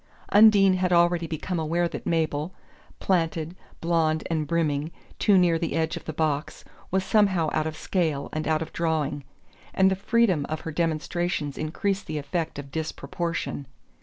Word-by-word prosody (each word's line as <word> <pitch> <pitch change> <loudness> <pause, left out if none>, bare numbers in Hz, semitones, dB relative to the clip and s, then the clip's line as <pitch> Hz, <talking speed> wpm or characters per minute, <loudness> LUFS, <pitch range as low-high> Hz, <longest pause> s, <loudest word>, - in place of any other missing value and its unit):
Undine 200 -3 +6
had 180 0 0
already 170 -1 +3
become 165 +3 -3
aware 170 +2 0
that - - -7
Mabel, 160 0 -1 0.4
planted, 165 -2 0 0.3
blond 160 -2 +1
and 155 -2 -1
brimming, 155 -2 0 0.3
too 205 -3 +4
near 175 -3 +3
the 165 - -2
edge 160 -1 0
of - - -8
the - - -3
box, 150 -2 -2 0.2
was 190 0 +1
somehow 190 -7 +3
out 155 0 0
of 155 0 -5
scale 160 -7 -1
and 155 0 -2
out 155 0 +1
of - - -12
drawing; 155 -4 -1 0.5
and 190 0 +4
the - - +2
freedom 200 -6 +2
of 155 - -3
her 160 - -5
demonstrations 165 -1 -1
increased 195 +6 -2
the 155 - -3
effect 155 +3 -3
of 140 -1 -8
disproportion. 160 -1 -4
165 Hz, 165 wpm, -26 LUFS, 155-180 Hz, 0.5 s, Undine